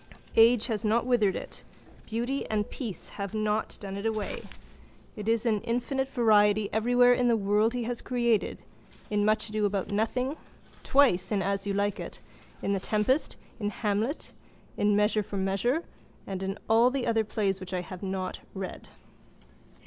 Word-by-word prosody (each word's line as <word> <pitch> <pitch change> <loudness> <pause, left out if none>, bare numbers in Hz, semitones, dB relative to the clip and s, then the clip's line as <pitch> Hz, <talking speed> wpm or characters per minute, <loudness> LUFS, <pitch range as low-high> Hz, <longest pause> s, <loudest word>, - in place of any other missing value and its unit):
Age 230 0 +6
has 220 -2 -2
not 225 +2 +2
withered 220 -6 +2
it. - - -7 0.4
Beauty 240 +5 -2
and 210 -1 0
peace 230 -9 -5
have 200 +1 -5
not 215 0 -1
done 195 -1 -6
it 200 - -5
away. 215 -2 -3 0.7
It 210 +1 -4
is 230 +1 +1
in 215 -3 +2
infinite 265 +3 -1
variety 210 -4 +3
everywhere 245 +3 +5
in 245 0 +2
the 235 -1 +4
world 210 +3 +2
he 245 - -1
has 240 +1 -3
created, 235 -3 +1 0.5
in 205 0 +2
Much 215 +1 +1
Ado 215 0 -1
about 200 -2 -1
Nothing, 250 +7 0 0.4
twice 235 -10 +3
in 200 -2 +1
As 200 +1 -1
you 200 - -1
like 205 0 0
It, - - -7 0.4
in 200 - +1
The 195 - 0
Tempest, 215 +9 0 0.2
in 205 -2 -1
Hamlet, 215 +6 -2 0.4
in 205 0 +2
Measure 210 +1 +3
for 200 0 -6
Measure—and 195 - -3
in 195 +1 -3
all 230 +2 +5
the 265 -1 -2
other 225 -1 +2
plays 200 -3 -1
which 185 -1 -8
I 180 -1 -1
have 180 0 -9
not 190 -1 -3 0.2
read. 190 -1 -6
215 Hz, 165 wpm, -28 LUFS, 200-235 Hz, 0.7 s, Age